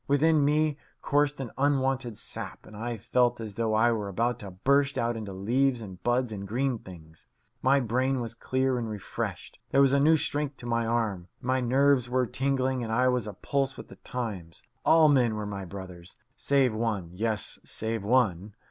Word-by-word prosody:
Within 150 +2 +4
me 150 0 +2 0.3
coursed 145 0 +1
an 130 -4 -5
unwonted 135 -4 +1
sap, - - -7
and 105 - -13
I 115 +2 -4
felt 120 +3 +1
as 110 -3 -6
though 110 +1 0
I 115 +2 +4
were 105 -3 -2
about 115 +5 -1
to 100 - -7
burst 140 +9 +1
out 120 0 0
into 110 -3 -5
leaves 120 +7 +1
and 95 -5 -9
buds 120 0 +1
and 100 -2 -6
green 125 +3 0
things. 80 -5 -13 0.3
My 135 +2 +4
brain 130 +2 0
was 115 -2 -4
clear 130 +2 0
and 115 -2 -3
refreshed. 105 -3 -5
There 135 - +3
was 135 -1 +5
a 140 - +4
new 155 +3 +5
strength 145 -1 -2
to - - -11
my 115 -1 0
arm. 110 -6 -1
My 130 +1 0
nerves 130 0 +3
were 130 0 +2
tingling 130 0 0
and 110 - -4
I 125 +3 +3
was 125 -4 0
a 105 - -5
pulse 135 +5 -1
with - - -10
the - - -13
times. 100 -10 -6 0.2
All 160 -1 +6
men 125 -6 +3
were 105 -1 -3
my 100 -2 -5
brothers. 90 -2 -10 0.2
Save 135 -4 +2
one 110 -6 -2
yes, 110 +1 -2
save 110 -1 -4
one. 105 -4 +1
120 Hz, 190 wpm, -28 LUFS, 105-135 Hz, 0.3 s, All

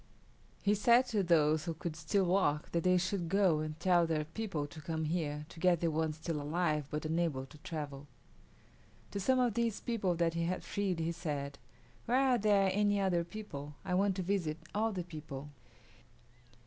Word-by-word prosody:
He 200 - +4
said 235 +5 +5
to 215 -3 +1
those 155 -3 +3
who 165 -2 -3
could 160 0 -5
still 165 +5 +1
walk 175 -5 +1
that 170 -1 0
they 180 0 +4
should 180 -1 -1
go 190 -5 +3
and 155 0 -4
tell 175 -1 +4
their 155 -2 0
people 165 -2 -3
to 155 +2 -10
come 160 0 -2
here, 150 -2 -2
to 165 - -12
get 180 -1 +4
the 165 -1 +1
ones 155 0 -1
still 160 -2 -3
alive 150 -1 0
but 150 +1 -3
unable 160 -4 0
to 150 +3 -15
travel. 145 -3 -6 1.0
To 200 - -3
some 260 +7 +3
of 245 -3 +2
these 230 -1 0
people 200 -7 -1
that 165 -1 +1
he 170 0 -1
had 185 +2 -2
freed 195 -3 -1
he 165 0 -1
said, 145 -4 -4 0.5
"Where 245 +3 +3
are 260 -2 +4
there 200 -2 +4
any 205 0 +2
other 180 -3 +2
people? 165 -6 -8
I 180 - -1
want 195 +1 +2
to 185 - -2
visit 175 -5 -1 0.2
all 220 +2 +1
the 185 -3 -3
people." 150 -4 -8
170 Hz, 190 wpm, -33 LUFS, 155-195 Hz, 1.0 s, said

